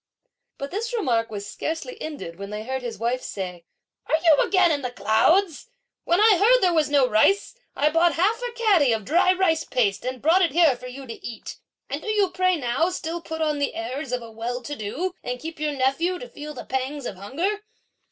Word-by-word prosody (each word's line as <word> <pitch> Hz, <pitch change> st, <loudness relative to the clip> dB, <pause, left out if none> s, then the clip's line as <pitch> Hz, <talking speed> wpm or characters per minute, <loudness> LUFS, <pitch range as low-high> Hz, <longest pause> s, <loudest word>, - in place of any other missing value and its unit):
But 275 Hz, 0 st, -6 dB
this 445 Hz, +5 st, -3 dB
remark 235 Hz, -, 0 dB
was 205 Hz, -2 st, -6 dB
scarcely 375 Hz, +9 st, -5 dB
ended 240 Hz, -, -7 dB
when 200 Hz, 0 st, -6 dB
they 210 Hz, +1 st, -5 dB
heard 260 Hz, +3 st, -3 dB
his 235 Hz, -3 st, -5 dB
wife 240 Hz, +4 st, -1 dB
say: 180 Hz, -3 st, -6 dB, 0.4 s
"Are -, -, +3 dB
you 320 Hz, -4 st, +6 dB
again 370 Hz, -3 st, +3 dB
in 290 Hz, -2 st, 0 dB
the 250 Hz, -, -3 dB
clouds? 320 Hz, -, +2 dB, 0.4 s
When 345 Hz, +2 st, +3 dB
I 420 Hz, -4 st, +6 dB
heard 455 Hz, +6 st, +6 dB
that -, -, +2 dB
there 360 Hz, -2 st, +3 dB
was 315 Hz, -3 st, +2 dB
no 280 Hz, -3 st, +4 dB
rice, 250 Hz, -, +3 dB, 0.2 s
I 300 Hz, +1 st, +2 dB
bought 335 Hz, +2 st, +3 dB
half 420 Hz, +8 st, +1 dB
a -, -, -3 dB
catty 395 Hz, -, +3 dB
of 220 Hz, -3 st, -3 dB
dry 345 Hz, -, +4 dB
rice 350 Hz, -4 st, +2 dB
paste, 220 Hz, -7 st, 0 dB
and 255 Hz, 0 st, -4 dB
brought 330 Hz, +8 st, +4 dB
it 340 Hz, -, +2 dB
here 325 Hz, -5 st, +5 dB
for 250 Hz, +1 st, -10 dB
you 265 Hz, +2 st, -9 dB
to 230 Hz, -2 st, -9 dB
eat; 235 Hz, -2 st, -7 dB, 0.3 s
and -, -, -4 dB
do -, -, -6 dB
you 410 Hz, -3 st, +2 dB
pray 370 Hz, 0 st, +2 dB
now 275 Hz, +3 st, 0 dB
still 340 Hz, -2 st, -4 dB
put 320 Hz, 0 st, -6 dB
on 300 Hz, -2 st, 0 dB
the 285 Hz, -, -1 dB
airs 295 Hz, -4 st, -4 dB
of 250 Hz, -1 st, -2 dB
a 230 Hz, -, -10 dB
well 240 Hz, +3 st, -4 dB
to 290 Hz, +4 st, -5 dB
do, 290 Hz, -, -3 dB
and 250 Hz, 0 st, -4 dB
keep 320 Hz, +2 st, -7 dB
your 300 Hz, -1 st, -1 dB
nephew 280 Hz, +7 st, 0 dB
to -, -, -8 dB
feel 300 Hz, -9 st, -9 dB
the 245 Hz, -, -8 dB
pangs 265 Hz, +2 st, -3 dB
of -, -, -4 dB
hunger?" 335 Hz, -, -2 dB
300 Hz, 225 wpm, -24 LUFS, 245-360 Hz, 0.4 s, you